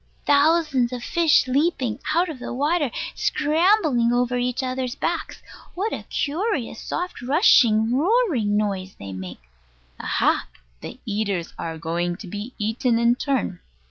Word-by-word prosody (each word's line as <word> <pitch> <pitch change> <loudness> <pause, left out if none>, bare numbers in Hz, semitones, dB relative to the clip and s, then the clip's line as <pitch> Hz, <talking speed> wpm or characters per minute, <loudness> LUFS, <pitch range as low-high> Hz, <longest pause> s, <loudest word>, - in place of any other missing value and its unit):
Thousands 290 -4 +3
of 245 -1 -5
fish 335 -6 +3
leaping 265 -3 0 0.2
out 350 +2 +3
of 310 -6 -7
the - - -6
water, 295 +2 +1 0.2
scrambling 305 - +2
over 245 0 +1
each 250 +2 -1
other's 255 0 -3
backs. 335 +3 -3 0.3
What 405 +5 -2
a - - -6
curious 300 - -2
soft 360 -4 -4
rushing 245 - +4
roaring 305 - +2
noise 195 -3 -2
they 100 -1 -8
make! 90 -7 -8 0.6
Aha! - - +1 0.3
The - - -8
eaters 205 -5 -2
are 165 -1 -4
going 170 +2 -2
to 210 - -10
be 205 +7 -7
eaten 230 +3 0
in 235 +1 +4
turn. 255 -8 -2
250 Hz, 140 wpm, -23 LUFS, 215-310 Hz, 0.6 s, rushing